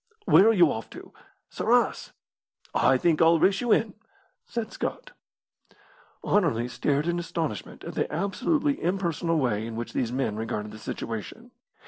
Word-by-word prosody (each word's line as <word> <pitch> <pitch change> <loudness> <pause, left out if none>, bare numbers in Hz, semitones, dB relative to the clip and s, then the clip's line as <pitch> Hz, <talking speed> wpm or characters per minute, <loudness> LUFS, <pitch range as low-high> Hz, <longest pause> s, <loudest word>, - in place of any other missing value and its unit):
"Where 200 - +6
are - - +7
you 175 -8 +5
off 110 - -5
to?" - - -12 0.4
"Sarras." - - +1 0.6
"I 130 - +4
think 165 +3 +2
I'll 165 +1 +6
race 195 +4 +2
you 240 -2 0
in," 215 -1 +2 0.5
said 230 -2 -4
Scott. - - -5 1.2
Anerley 145 - +2
stared 145 +4 0
in 175 0 0
astonishment 165 -8 -4
at - - -7
the - - -2
absolutely 255 - 0
impersonal 170 -2 0
way 115 -6 0
in 115 - -6
which 120 +1 -5
these 120 -2 -1
men 125 -5 -1
regarded 110 -2 -4
the 110 - -10
situation. 115 - -6
165 Hz, 150 wpm, -26 LUFS, 120-195 Hz, 1.2 s, are